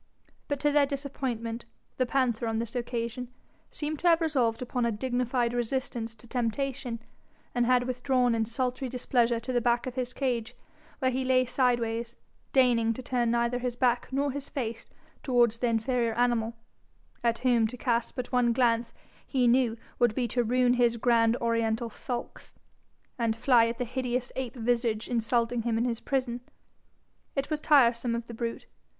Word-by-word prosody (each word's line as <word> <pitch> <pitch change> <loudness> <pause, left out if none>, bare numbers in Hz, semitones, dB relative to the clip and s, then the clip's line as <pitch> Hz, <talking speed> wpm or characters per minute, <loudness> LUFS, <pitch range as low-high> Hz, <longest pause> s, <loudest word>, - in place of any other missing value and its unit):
But 285 -1 -2
to 295 - +3
their 290 -1 +4
disappointment, 255 -5 -4 0.3
the 255 - +1
panther 240 -3 +1
on 225 0 -1
this 230 +2 -4
occasion 240 0 -3 0.4
seemed 300 0 -4
to 355 - 0
have 335 -1 +6
resolved 255 -8 +1
upon 250 0 -2
a 235 - +2
dignified 245 +1 0
resistance 240 -1 -2
to 230 +2 -17
temptation, 245 0 -2 0.5
and 245 -1 +1
had 250 -1 +4
withdrawn 250 -1 +1
in 225 -1 0
sultry 255 +2 -2
displeasure 240 -1 +1
to 235 +3 -4
the 245 - +2
back 240 0 +1
of 255 - -4
his 250 -1 -3
cage, 245 -3 -2 0.4
where 260 -2 +1
he 260 +1 -1
lay 255 0 +3
sideways, 235 -2 0 0.4
deigning 240 -4 +4
to 255 - -7
turn 245 -2 0
neither 235 +1 +1
his 245 -1 -2
back 245 -1 +1
nor 280 +1 0
his 280 +1 -6
face 230 -5 -4 0.3
towards 240 -4 +2
the 245 - +1
inferior 230 0 +1
animal, 235 -2 +1 0.7
at 230 -1 +2
whom 235 -3 +4
to 250 +3 -8
cast 235 -2 0
but 250 -2 -5
one 245 -2 +3
glance, 235 -1 +1 0.3
he 255 -3 +2
knew, 240 -1 +3 0.2
would 240 -3 +3
be 245 -2 0
to 245 +2 0
ruin 245 +1 +3
his 240 -1 +2
grand 230 0 +3
Oriental 230 0 0
sulks, 240 +2 -6 0.6
and 230 -2 +1
fly 235 -1 +4
at 230 0 -3
the 245 - -2
hideous 250 0 -2
ape 260 -2 -4
visage 235 -2 0
insulting 235 0 0
him 225 0 0
in 235 - +1
his 235 -2 -1
prison. 255 -3 -2 0.9
It 275 +2 -2
was 305 - 0
tiresome 240 -6 +4
of 235 0 -4
the 235 - -9
brute. 230 0 -4
245 Hz, 170 wpm, -28 LUFS, 230-255 Hz, 0.9 s, have